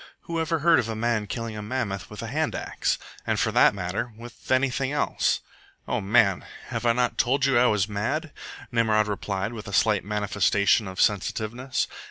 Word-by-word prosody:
"Who 165 -1 -4
ever 160 +1 0
heard 165 +1 +4
of 115 - -2
a 110 - -3
man 110 -1 0
killing 115 +1 -4
a 105 - -5
mammoth 105 -4 -3
with - - -8
a - - -4
hand - - -1
axe? - - -1 0.3
And, - - +1
for - - +1
that - - +5
matter, 95 +6 -3
with 120 0 -12
anything 130 +1 +1
else?" 145 - 0 0.5
"O - - -1
man, 100 -2 +3 0.3
have 120 - -2
I 115 - +5
not 125 0 0
told 135 +2 +2
you 135 -3 +4
I 125 - +5
was 105 -3 +2
mad?" 125 +10 -2 0.4
Nimrod 110 -2 +2
replied, 100 +1 -3
with 110 -2 -8
a 100 - -7
slight 105 0 +3
manifestation 105 0 +2
of 95 -1 -7
sensitiveness. 110 +5 0
110 Hz, 190 wpm, -25 LUFS, 105-125 Hz, 0.5 s, that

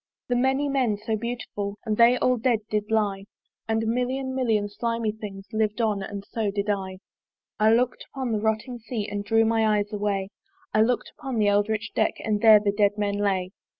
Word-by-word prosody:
The 245 - +2
many 265 +3 +2
men 255 -7 +1
so 220 +2 -2
beautiful, 210 -3 -4
And 215 - 0
they 235 +3 +6
all 255 0 +2
dead 230 -1 +1
did 210 0 -1
lie! 205 -3 0 0.4
And 225 0 0
a - - -2
million 255 +3 -1
million 225 -6 +1
slimy 230 +1 -2
things 205 -2 -8
Liv'd 215 +1 0
on 215 -3 +1
and 200 +1 -6
so 220 -3 -2
did 200 +1 -1
I. 190 -2 -3 0.6
I 215 +1 +5
look'd 250 +1 0
upon 260 -3 -3
the 215 - 0
rotting 220 +3 -1
Sea, 220 -2 -4
And 205 -1 -4
drew 225 +2 +3
my 220 -1 +2
eyes 205 +1 -2
away; 200 -2 -1 0.4
I 215 - +4
look'd 245 +3 +1
upon 265 -5 -4
the 210 -2 +3
eldritch 205 +2 0
deck, - - +1
And 210 -2 0
there 220 -2 +8
the 205 -1 +1
dead 205 0 +2
men 205 -1 -1
lay. 190 -3 0
215 Hz, 200 wpm, -25 LUFS, 205-235 Hz, 0.6 s, there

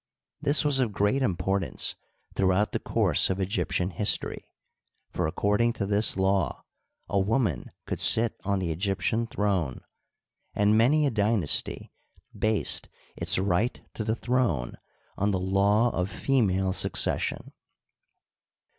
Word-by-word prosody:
This 145 +1 +3
was 145 -2 +3
of 120 -5 0
great 105 +8 0
importance 95 -3 -1 0.4
throughout 95 +2 +1
the - - -2
course - - +1
of 95 +1 -2
Egyptian 95 -1 -2
history, 100 +5 -1 0.7
for - - -2
according 105 +8 0
to 105 - -4
this 105 0 +2
law 95 -3 0 0.4
a 100 - 0
woman 100 - -1 0.2
could - - -4
sit 115 0 +5
on 100 0 -1
the 90 -3 -2
Egyptian 100 +6 -1
throne, 95 - -2 0.7
and 105 +1 +2
many 140 +7 +3
a 140 - 0
dynasty 105 -6 0 0.4
based 110 -1 +2 0.3
its - - +3
right 95 +5 0
to 110 - -5
the 110 +1 -1
tnrone 120 - -1 0.5
on 100 - +1
the 95 -2 -1
law 100 +5 +2
of 90 +1 -2
female 95 -7 0
succession. - - -1
100 Hz, 130 wpm, -26 LUFS, 95-115 Hz, 0.7 s, sit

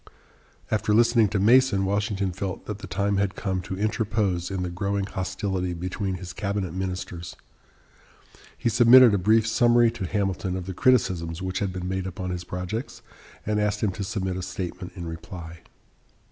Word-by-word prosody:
After 105 -1 +2
listening 115 -1 +5
to 100 - -1
Mason, 110 -2 +4
Washington 100 -1 0
felt 95 +1 -5
that 105 -1 -5
the - - -8
time 100 +3 0
had 100 -1 0
come 95 -3 -2
to 95 +1 -6
interpose 105 -4 0
in 95 -2 -2
the 90 - -3
growing 100 +2 -1
hostility 95 -2 -3
between 90 +2 -3
his 90 -1 -7
cabinet 100 -4 -3
ministers. 90 -2 -5 1.2
He - - -1
submitted 120 +1 +7
a 100 - +2
brief 110 +4 +4
summary 120 0 +4
to 110 -6 -5
Hamilton 95 -2 -1
of 90 - -5
the 95 - -5
criticisms 90 -8 +1
which 95 0 -2
had 100 -2 -1
been 90 -1 -5
made 95 0 -2
upon 95 -1 -5
his 90 -1 -4
projects 90 +7 -5 0.4
and 105 0 0
asked 105 0 0
him 105 - +2
to 100 +2 -5
submit 95 -2 -2
a - - -3
statement 90 0 -6
in 85 -3 -6
reply. 80 0 -8
95 Hz, 175 wpm, -25 LUFS, 90-105 Hz, 1.2 s, submitted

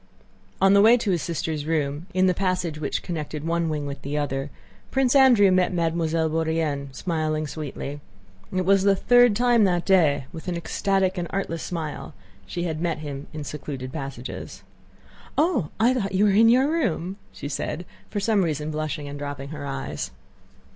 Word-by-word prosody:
On 195 +1 +5
the 200 - +7
way 230 +3 +7
to 215 -4 -1
his 175 -3 +1
sister's 160 -2 -3
room, 150 0 -1
in 185 0 +2
the 185 - +4
passage 180 -4 -1
which 150 - -2
connected 155 -3 -4
one 170 0 0
wing 150 -2 -2
with 140 -1 -6
the 145 +2 -3
other, 140 -1 -2 0.4
Prince 265 -1 +2
Andrew 245 -8 +6
met 185 -1 +3
Mademoiselle 165 -2 0
Bourienne 160 -3 -1
smiling 155 0 -1
sweetly. 145 -1 -6 0.5
It 185 -1 -1
was 195 +1 +4
the 200 0 +4
third 245 +2 +5
time 240 0 +4
that 175 -2 +1
day 170 -7 +4
that, - - -24
with 165 +2 -9
an 175 -1 -1
ecstatic 190 +2 0
and 175 - -2
artless 165 -4 -3
smile, 160 -4 -5 0.3
she 175 - -3
had 160 -2 -3
met 170 -2 0
him 145 -2 -6
in 155 -1 -6
secluded 140 -3 -6
passages. 135 -4 -7 0.7
"Oh! 290 - +2
I 235 +3 +4
thought 195 -6 -2
you 200 +3 +4
were 205 - +4
in 225 +3 +6
your 255 +4 +5
room," 195 - -1
she - - -7
said, 155 +3 -3 0.2
for 210 - -2
some 205 0 +2
reason 155 -2 -2
blushing 150 -1 -3
and 140 0 -7
dropping 145 -1 -5
her 150 -2 -6
eyes. 135 -1 -4
165 Hz, 180 wpm, -24 LUFS, 150-195 Hz, 0.7 s, the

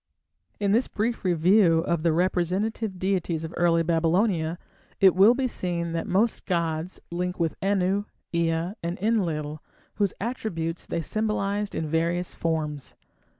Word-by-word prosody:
In 200 -1 +1
this 235 +5 +3
brief 230 +3 -2
review 175 -1 +4
of 170 -1 -1
the 165 0 +2
representative 185 +5 0
deities 180 -3 -1
of 160 +1 -6
early 170 -1 +3
Babylonia, 165 +1 +1 0.4
it 190 -3 +7
will 200 +6 +6
be 260 0 0
seen 170 -6 -2
that 165 0 -3
most 210 +5 +1
gods 170 -1 -1
link 180 +1 -3
with 165 -2 +1
Anu, 195 +1 +1 0.3
Ea, 170 +2 0
and 170 +1 -3
Enlil, 165 -8 -1 0.4
whose 205 -2 +1
attributes 185 -8 -3
they 165 - -2
symbolized 205 +1 -1
in 160 - -1
various 170 +3 0
forms. 155 -4 -3
175 Hz, 140 wpm, -26 LUFS, 165-200 Hz, 0.4 s, it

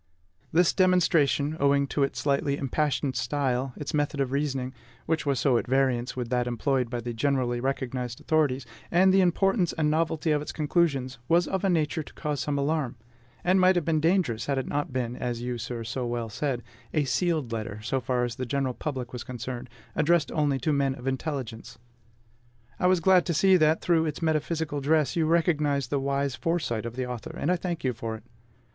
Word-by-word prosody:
This 175 +2 +4
demonstration, 165 -5 +3
owing 140 0 +3
to 145 - -1
its 140 - 0
slightly 140 0 +1
impassioned 140 0 -1
style, 130 0 -1
its 145 - -5
method 145 -1 0
of 135 -2 0
reasoning, 135 -2 -1 0.3
which 160 -2 -1
was 140 -3 +1
so 125 -4 +3
at - - -6
variance 130 -2 +1
with 120 -2 -3
that 125 -1 0
employed 125 +1 0
by 120 -1 -3
the 120 0 -4
generally 125 -1 0
recognized 125 -2 -3
authorities, 145 -5 +1 0.2
and 185 +2 +4
the 195 - +5
importance 185 +1 +2
and 150 -2 +1
novelty 160 0 0
of 150 -1 +2
its 150 - -5
conclusions, 140 -5 0
was 170 0 +3
of 190 0 -2
a 195 - +2
nature 160 -1 +1
to - - -12
cause 150 -3 -2
some 145 +2 -1
alarm; 140 -2 0 0.5
and 185 +1 +3
might 185 0 +5
have 175 -4 0
been 160 -2 +2
dangerous, 160 - +1
had 140 -1 0
it 130 - -1
not 145 -1 -2
been 125 -2 -2
as 120 -1 -3
you, 125 -1 -3
sir, 120 0 -4
so 115 +3 -3
well 120 -1 -3
said 125 +2 -2 0.3
a 150 - +3
sealed 155 -3 0
letter, 110 -2 -4
so 130 +3 -1
far 125 0 0
as 120 -1 -3
the 130 - -3
general 135 0 0
public 130 -3 -5
was 125 - -5
concerned, 125 0 -6 0.3
addressed 165 +1 +2
only 145 -3 +1
to 150 +4 0
men 140 -2 +1
of 125 - -11
intelligence. 130 -4 -4 1.0
I 180 - +3
was 185 -2 +3
glad 185 0 +5
to 170 - 0
see 190 +4 +5
that 155 -1 +3
through 165 -2 +2
its 150 - -4
metaphysical 160 -2 -1
dress 150 -1 +2
you 165 -2 +2
recognized 150 -5 +1
the 140 - +1
wise 140 0 0
foresight 130 -7 -1
of 115 - -7
the 130 0 -2
author; 125 -3 -6
and 170 - 0
I - - +3
thank 175 -2 -4
you 130 -2 +1
for 115 -1 -4
it. 110 - -11
140 Hz, 200 wpm, -27 LUFS, 125-160 Hz, 1.0 s, the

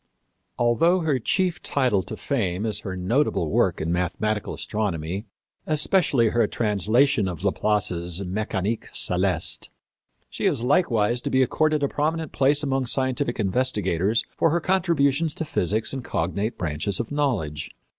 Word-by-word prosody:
Although 130 +10 +3
her 150 -5 +1
chief 180 - 0
title 125 -8 +1
to - - -8
fame 105 -7 -1
is 105 -2 -1
her 95 -3 -6
notable 90 - 0
work - - +2
in 80 +2 -2
mathematical 100 +5 -1
astronomy, 95 -2 -3 0.4
especially 150 - +3
her 120 +1 +2
translation 110 +2 +2
of 90 0 -5
Laplace's 95 -4 0
Méchanique 105 +2 -2
Céleste, 90 -2 0 0.6
she - - -5
is 115 - 0
likewise 120 - +2
to - - -3
be 130 0 +3
accorded 155 +3 +1
a - - +3
prominent 155 +2 -2
place 140 +2 +2
among 135 -2 0
scientific 130 0 0
investigators 105 -2 +1
for 165 - +2
her 170 +3 +1
contributions 165 -4 +1
to 160 - -3
physics 110 - -1
and 135 -2 -4
cognate 100 +6 -2
branches 85 +3 -2
of 120 +2 -4
knowledge. 100 - -1
115 Hz, 140 wpm, -24 LUFS, 95-140 Hz, 0.6 s, Although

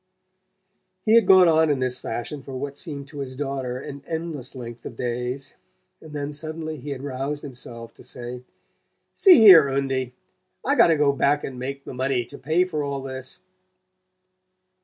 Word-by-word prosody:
He 220 - +4
had 230 -4 +6
gone 185 -2 +8
on 160 -1 +4
in 145 - +2
this 130 -1 -1
fashion 120 +5 -5
for 135 0 -10
what 140 +2 -5
seemed 145 -3 -5
to 145 -1 -9
his 130 -2 -5
daughter 135 -2 -3
an 140 +2 -8
endless 160 -5 -5
length 120 -2 -8
of - - -8
days; 125 +2 -3 0.5
and 160 - -12
then 145 0 -4
suddenly 155 +1 -5
he 145 +2 -8
had 135 -1 -5
roused 140 +2 -4
himself 120 -4 -9
to - - -16
say: 125 0 -8 0.7
"See 380 -3 +7
here, 185 - +9
Undie, 135 -2 -2 0.5
I - - +2
got - - +6
to 165 -2 +3
go 145 -1 +3
back 140 +1 +1
and 130 -2 -6
make 135 +2 -5
the - - -7
money 130 -1 -1
to 140 +4 -12
pay 160 +6 +2
for 155 -5 -3
all 140 -1 -3
this." 130 -1 -7
140 Hz, 180 wpm, -24 LUFS, 130-150 Hz, 0.7 s, here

